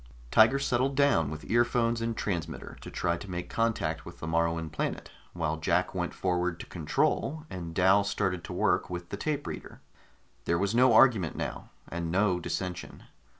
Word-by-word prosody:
Tiger 115 Hz, +5 st, +6 dB
settled 135 Hz, 0 st, 0 dB
down 135 Hz, -, +3 dB
with 75 Hz, +1 st, -7 dB
earphones 120 Hz, 0 st, +2 dB
and 115 Hz, 0 st, -2 dB
transmitter 85 Hz, -6 st, -4 dB
to -, -, -8 dB
try 85 Hz, -1 st, -1 dB
to 100 Hz, -, -9 dB
make 90 Hz, -1 st, -5 dB
contact 100 Hz, -9 st, 0 dB
with 85 Hz, 0 st, -11 dB
the -, -, -5 dB
Moruan 85 Hz, -1 st, 0 dB
planet, 75 Hz, -, -3 dB, 0.2 s
while 80 Hz, +2 st, -1 dB
Jack 85 Hz, +3 st, +1 dB
went 90 Hz, -2 st, -2 dB
forward 90 Hz, -2 st, -1 dB
to -, -, -7 dB
control 135 Hz, -, -1 dB
and 85 Hz, -3 st, -6 dB
Dal 95 Hz, +2 st, +5 dB
started 95 Hz, -3 st, -1 dB
to -, -, -6 dB
work -, -, +1 dB
with 90 Hz, -1 st, -6 dB
the -, -, -4 dB
tape 145 Hz, +3 st, -2 dB
reader. -, -, -7 dB, 0.7 s
There 85 Hz, -, +2 dB
was 100 Hz, +3 st, 0 dB
no 125 Hz, +1 st, +5 dB
argument 110 Hz, -8 st, +5 dB
now, -, -, -5 dB, 0.2 s
and 85 Hz, -1 st, -4 dB
no 95 Hz, -1 st, +2 dB
dissension. 90 Hz, 0 st, -5 dB
90 Hz, 175 wpm, -29 LUFS, 85-115 Hz, 0.7 s, Tiger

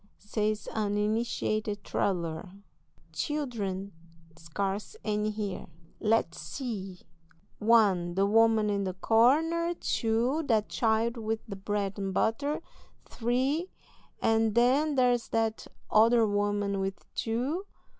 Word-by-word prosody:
says 210 Hz, 0 st, -2 dB
an 205 Hz, -2 st, 0 dB
initiated 215 Hz, -1 st, -1 dB
traveller, 170 Hz, -2 st, -2 dB, 0.6 s
"children! 210 Hz, -, -3 dB, 0.4 s
scarce 195 Hz, -, -4 dB
any 210 Hz, 0 st, 0 dB
here; 210 Hz, -3 st, -4 dB, 0.3 s
let's 220 Hz, -5 st, +1 dB
see: 195 Hz, -, -5 dB, 0.6 s
one; 200 Hz, -6 st, +3 dB
the 195 Hz, +1 st, +3 dB
woman 220 Hz, +1 st, +4 dB
in 200 Hz, -1 st, 0 dB
the 185 Hz, -2 st, -3 dB
corner, 320 Hz, -, +3 dB
two; 240 Hz, +3 st, 0 dB
that 220 Hz, -3 st, +2 dB
child 230 Hz, +1 st, +1 dB
with 225 Hz, 0 st, -3 dB
the 210 Hz, -4 st, -6 dB
bread 200 Hz, 0 st, -2 dB
and 195 Hz, -1 st, -3 dB
butter, 280 Hz, +7 st, 0 dB, 0.4 s
three; 260 Hz, +9 st, -1 dB, 0.5 s
and 225 Hz, -1 st, +2 dB
then 275 Hz, +5 st, +3 dB
there's 245 Hz, -2 st, +2 dB
that 225 Hz, -1 st, -1 dB, 0.2 s
other 225 Hz, +1 st, +5 dB
woman 205 Hz, -1 st, 0 dB
with 195 Hz, 0 st, -4 dB
two. 265 Hz, -, -2 dB
220 Hz, 110 wpm, -29 LUFS, 200-240 Hz, 0.6 s, other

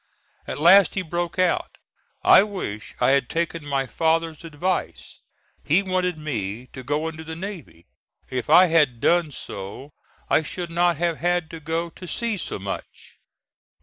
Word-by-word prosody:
At -, -, -4 dB
last 180 Hz, +4 st, +6 dB
he 190 Hz, -, -1 dB
broke 175 Hz, +1 st, -3 dB
out, 185 Hz, -1 st, 0 dB, 0.5 s
"I -, -, +8 dB
wish 185 Hz, -, -5 dB
I -, -, +4 dB
had 135 Hz, -3 st, +2 dB
taken 165 Hz, -1 st, -2 dB
my 140 Hz, -2 st, -1 dB
father's 165 Hz, +2 st, 0 dB
advice; 165 Hz, +3 st, -3 dB, 0.4 s
he 165 Hz, +7 st, +3 dB
wanted 185 Hz, -2 st, -1 dB
me 120 Hz, -7 st, -4 dB
to 130 Hz, -, -7 dB
go 145 Hz, +5 st, -1 dB
into 160 Hz, 0 st, -6 dB
the 160 Hz, 0 st, -7 dB
navy; 170 Hz, -, -8 dB, 0.4 s
if 130 Hz, +2 st, -4 dB
I 180 Hz, +4 st, +8 dB
had 150 Hz, -8 st, +2 dB
done 170 Hz, +3 st, +2 dB
so, 100 Hz, +4 st, -8 dB, 0.4 s
I -, -, +3 dB
should 170 Hz, +2 st, -5 dB
not 175 Hz, -1 st, +2 dB
have 170 Hz, -1 st, 0 dB
had 175 Hz, -1 st, 0 dB
to 165 Hz, -, -7 dB
go 165 Hz, +2 st, -3 dB
to 180 Hz, -, -11 dB
sea 230 Hz, +2 st, -2 dB
so -, -, -4 dB
much." 95 Hz, 0 st, -8 dB
165 Hz, 160 wpm, -23 LUFS, 145-175 Hz, 0.5 s, I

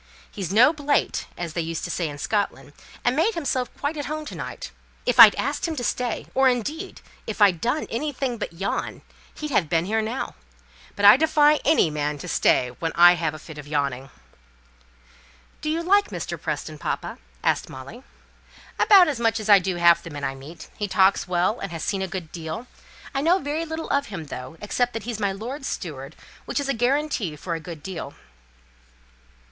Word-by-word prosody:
He's 190 Hz, -3 st, -5 dB
'no 235 Hz, +9 st, +6 dB
blate,' 290 Hz, -2 st, 0 dB
as 170 Hz, -3 st, -5 dB
they 170 Hz, -, -1 dB
used 165 Hz, 0 st, -4 dB
to 175 Hz, -, -3 dB
say 170 Hz, -3 st, -1 dB
in 145 Hz, -, -8 dB
Scotland, 145 Hz, -, -2 dB, 0.3 s
and 245 Hz, +1 st, +3 dB
made 370 Hz, +10 st, +2 dB
himself 260 Hz, -6 st, -1 dB
quite 290 Hz, +2 st, -2 dB
at 290 Hz, -3 st, -4 dB
home 305 Hz, +1 st, -4 dB
to -, -, -8 dB
night. -, -, -7 dB, 0.3 s
If -, -, 0 dB
I'd -, -, +11 dB
asked -, -, -2 dB
him 325 Hz, -, -3 dB
to 250 Hz, -, -4 dB
stay, 240 Hz, +1 st, -2 dB
or, 265 Hz, 0 st, +4 dB
indeed, 295 Hz, -, -3 dB, 0.3 s
if 220 Hz, -, -5 dB
I'd 195 Hz, -5 st, +4 dB
done 250 Hz, +6 st, 0 dB
anything 260 Hz, -2 st, -2 dB
but -, -, -4 dB
yawn, 190 Hz, +4 st, -4 dB, 0.3 s
he'd 300 Hz, -1 st, -5 dB
have 180 Hz, -, +2 dB
been 165 Hz, 0 st, +1 dB
here 220 Hz, +3 st, 0 dB
now. 225 Hz, +4 st, -4 dB, 0.6 s
But 205 Hz, -, 0 dB
I 205 Hz, +5 st, +10 dB
defy 300 Hz, 0 st, +4 dB
any 290 Hz, -, +3 dB
man 150 Hz, 0 st, -2 dB
to -, -, -8 dB
stay 125 Hz, -1 st, +2 dB
when 165 Hz, -1 st, -1 dB
I've 175 Hz, 0 st, +7 dB
a 155 Hz, -, -9 dB
fit 155 Hz, -1 st, -11 dB
of 145 Hz, -, -10 dB
yawning." 140 Hz, -3 st, -2 dB, 1.5 s
"Do 305 Hz, -, -2 dB
you 330 Hz, +2 st, -1 dB
like 405 Hz, +3 st, +3 dB
Mr. -, -, -5 dB
Preston, 155 Hz, -1 st, -4 dB
papa?" -, -, -4 dB, 0.2 s
asked -, -, +1 dB
Molly. 135 Hz, -, -10 dB, 0.8 s
"About 385 Hz, -4 st, +7 dB
as 285 Hz, -6 st, -2 dB
much 225 Hz, -1 st, +1 dB
as 215 Hz, 0 st, -5 dB
I 200 Hz, -1 st, +9 dB
do 185 Hz, -1 st, -2 dB
half 170 Hz, -1 st, +5 dB
the -, -, -9 dB
men 145 Hz, -2 st, -7 dB
I 135 Hz, -, -1 dB
meet. 140 Hz, +5 st, -11 dB
He 205 Hz, -, -1 dB
talks 190 Hz, -1 st, +3 dB
well, 180 Hz, +5 st, +1 dB
and 195 Hz, -, -5 dB
has 165 Hz, -2 st, -5 dB
seen 195 Hz, -2 st, -1 dB
a 190 Hz, -, -1 dB
good 175 Hz, -3 st, -6 dB
deal. 165 Hz, +7 st, -6 dB, 0.5 s
I 275 Hz, -, 0 dB
know 340 Hz, +5 st, +4 dB
very 305 Hz, 0 st, -3 dB
little 320 Hz, 0 st, -5 dB
of 280 Hz, 0 st, +1 dB
him, 170 Hz, -6 st, -6 dB
though, 130 Hz, +2 st, -8 dB
except 245 Hz, +4 st, -1 dB
that 225 Hz, -2 st, -5 dB
he's 230 Hz, -2 st, -4 dB
my 200 Hz, -2 st, +1 dB
lord's 250 Hz, +8 st, -6 dB
steward, 140 Hz, -6 st, -6 dB, 0.3 s
which -, -, -2 dB
is 285 Hz, -, -3 dB
a 275 Hz, -, +1 dB
guarantee 245 Hz, -, 0 dB
for 170 Hz, +3 st, -5 dB
a 165 Hz, -, -3 dB
good 160 Hz, -2 st, -9 dB
deal." 170 Hz, -6 st, -6 dB
210 Hz, 200 wpm, -24 LUFS, -, 1.5 s, I'd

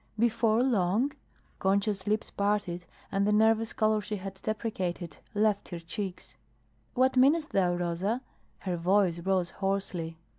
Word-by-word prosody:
"Before 230 Hz, 0 st, +3 dB
long?" 225 Hz, +2 st, +2 dB, 0.5 s
Concha's 200 Hz, +1 st, +1 dB
lips 215 Hz, +1 st, 0 dB
parted 200 Hz, -4 st, -1 dB, 0.2 s
and 200 Hz, 0 st, +1 dB
the -, -, +3 dB
nervous 220 Hz, +1 st, +3 dB
color 215 Hz, 0 st, +2 dB
she 210 Hz, +1 st, -4 dB
had 195 Hz, -1 st, -6 dB
deprecated 190 Hz, -6 st, -3 dB, 0.2 s
left 210 Hz, -1 st, +1 dB
her 175 Hz, -, -5 dB
cheeks. 185 Hz, +2 st, -6 dB, 0.6 s
"What 260 Hz, +1 st, +3 dB
meanest 295 Hz, +5 st, +4 dB
thou, 180 Hz, -2 st, +2 dB
Rosa?" 175 Hz, +7 st, -1 dB, 0.4 s
Her 180 Hz, -2 st, -2 dB
voice 180 Hz, 0 st, +2 dB
rose 185 Hz, 0 st, 0 dB
hoarsely. 190 Hz, -4 st, -2 dB
200 Hz, 135 wpm, -29 LUFS, 180-220 Hz, 0.6 s, meanest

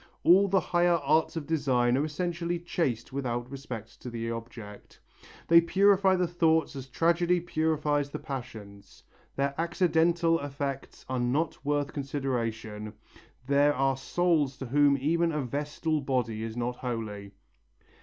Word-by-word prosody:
"All 195 Hz, +4 st, +6 dB
the 195 Hz, 0 st, +3 dB
higher 175 Hz, -1 st, +2 dB
arts 155 Hz, +4 st, +2 dB
of 160 Hz, -3 st, -4 dB
design 130 Hz, -6 st, +1 dB
are 140 Hz, -, +1 dB
essentially 170 Hz, +2 st, -2 dB
chaste 150 Hz, -9 st, -2 dB
without 120 Hz, -3 st, -2 dB
respect 125 Hz, -6 st, -8 dB
to 125 Hz, -, -6 dB
the 115 Hz, -1 st, -4 dB
object. 115 Hz, -3 st, -9 dB, 0.5 s
"They 170 Hz, 0 st, +7 dB
purify 195 Hz, +2 st, +4 dB
the 180 Hz, -1 st, +1 dB
thoughts 160 Hz, -3 st, +1 dB
as 135 Hz, -1 st, -7 dB
tragedy 170 Hz, +5 st, +2 dB
purifies 155 Hz, -4 st, 0 dB
the -, -, -5 dB
passions. 105 Hz, -7 st, -9 dB, 0.3 s
Their 140 Hz, 0 st, 0 dB
accidental 170 Hz, -1 st, +2 dB
effects 140 Hz, -1 st, -5 dB
are 130 Hz, -1 st, -2 dB
not 135 Hz, +6 st, -1 dB
worth 145 Hz, 0 st, -1 dB
consideration; 115 Hz, -7 st, -3 dB, 0.5 s
there 140 Hz, +1 st, +3 dB
are 135 Hz, 0 st, +1 dB
souls 150 Hz, -1 st, 0 dB
to 135 Hz, -, -6 dB
whom 140 Hz, +2 st, +3 dB
even 165 Hz, +4 st, +1 dB
a 150 Hz, -1 st, -1 dB
vestal 150 Hz, +4 st, -2 dB
body 125 Hz, -5 st, -1 dB
is 115 Hz, +1 st, -5 dB
not 120 Hz, +1 st, -2 dB
holy." 105 Hz, -5 st, -5 dB
140 Hz, 140 wpm, -28 LUFS, 120-165 Hz, 0.5 s, They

